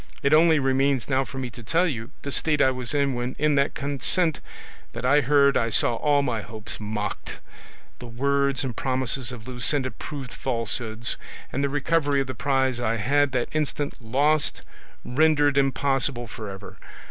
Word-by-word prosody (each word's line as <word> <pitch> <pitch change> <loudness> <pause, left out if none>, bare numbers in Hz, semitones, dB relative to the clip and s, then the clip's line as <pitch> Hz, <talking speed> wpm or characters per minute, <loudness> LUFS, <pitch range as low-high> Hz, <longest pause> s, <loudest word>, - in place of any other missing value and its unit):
It 140 - +3
only 160 +1 +6
remains 135 -1 +1
now 135 0 +2
for 135 - -9
me 130 -2 -4
to 120 - -11
tell 165 +10 +1
you 115 -7 -4
the 140 - -4
state 150 +1 +2
I 130 - +4
was 125 -2 -2
in 140 -2 +1
when 120 +1 -3
in 150 0 +2
that 140 0 +1
consent 145 +4 0 0.5
that - - -5
I 145 +3 +5
heard 140 +1 +4
I 115 - +1
saw 115 - +3
all 145 +4 +2
my 120 -5 -1
hopes 110 0 -7
mocked, 105 -1 -5 0.6
the 125 - -9
words 140 +3 0
and 125 -4 -4
promises 130 -2 -1
of 115 -2 -9
Luscinda 130 +1 +1
proved 135 -5 -7
falsehoods, 115 -2 -2 0.4
and 140 - -1
the 140 - +1
recovery 145 0 +1
of 135 - 0
the 130 - -5
prize 130 -3 0
I 115 -2 0
had 140 +5 +2
that 125 -2 -1
instant 150 -1 -1
lost 140 +6 +1 0.4
rendered 145 +1 +3
impossible 135 -2 +1
for 110 -2 -8
ever. 95 +1 -10
135 Hz, 175 wpm, -25 LUFS, 120-145 Hz, 0.6 s, only